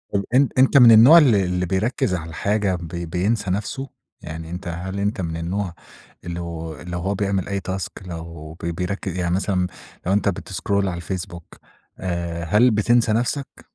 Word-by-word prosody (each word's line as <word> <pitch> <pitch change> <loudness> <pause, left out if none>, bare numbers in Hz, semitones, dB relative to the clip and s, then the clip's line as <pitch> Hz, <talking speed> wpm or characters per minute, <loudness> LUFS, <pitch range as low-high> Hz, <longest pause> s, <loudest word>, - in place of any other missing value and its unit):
أ 100 - +1
أنت 135 +1 +4
أنت 135 +2 +6
من 120 -3 +9
النوع 120 +9 +9
اللي 120 - +5
اللي 90 0 -1
بيركز 100 +3 0
على 80 -1 -5
الحاجة 100 +3 0
ب 85 -2 -6
بينسى 90 +5 -1
نفسه؟ 130 +8 -3 0.3
يعني 80 +1 -7
أنت 90 +2 -6
هل 90 +3 -4
أنت 100 -1 -1
من 80 -1 -3
النوع 90 +2 -3 0.5
اللي 85 0 -5 0.5
لو 90 - -2
هو 100 +3 -1
بيعمل 100 -2 -1
أي 100 0 -1
task 95 0 -5
لو 80 -2 -8
بي 85 - -1
بيركز 90 +1 -3
يعني 90 -1 0
مثلًا 95 -2 0 0.4
لو 95 - +1
أنت 100 0 +2
بتسكرول 100 +1 -2
على 90 - -3
الفيسبوك 85 -1 -6 0.5
آآ، 85 -2 -3
هل 110 +8 +4
بتنسى 110 +2 +3
نفسك؟ 125 +5 -2
95 Hz, 170 wpm, -22 LUFS, 85-105 Hz, 0.5 s, من